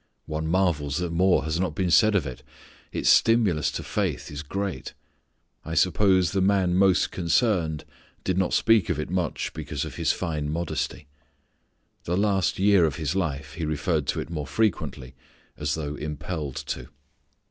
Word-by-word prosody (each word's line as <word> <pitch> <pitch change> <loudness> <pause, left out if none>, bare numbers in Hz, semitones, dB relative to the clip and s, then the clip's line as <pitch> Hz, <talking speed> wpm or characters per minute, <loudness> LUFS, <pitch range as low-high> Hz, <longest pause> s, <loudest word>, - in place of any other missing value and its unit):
One 80 0 -3
marvels 80 -5 +1
that 90 -1 -2
more 90 -2 +3
has 80 +2 -2
not 90 -5 -1
been 90 -2 0
said 110 +3 +5
of 90 -7 +2
it. 65 -3 -7 0.5
Its - - -2
stimulus 105 -10 +4
to - - -4
faith - - -2
is 75 0 -5
great. 90 -2 -4 0.7
I 80 - -5
suppose 95 +1 +3
the 95 - 0
man 95 -2 +2
most 95 0 +3
concerned 85 - +1 0.4
did 95 - 0
not 95 -1 +1
speak 115 -5 +3
of 85 -4 0
it 75 - -4
much 90 -4 -2
because 75 -3 -4
of - - -8
his - - +2
fine 75 -3 -3
modesty. 85 -2 -3 1.0
The 90 +1 0
last 100 -3 +1
year 100 -2 +5
of 75 -5 -1
his 80 +2 -2
life 75 -7 -2
he 85 0 -5
referred 75 0 -1
to - - -1
it - - -6
more 75 -4 -4
frequently 90 - -1 0.4
as 75 -1 -2
though 75 -2 -4
impelled 75 -1 -5
to. - - -5
85 Hz, 170 wpm, -25 LUFS, 75-95 Hz, 1.0 s, said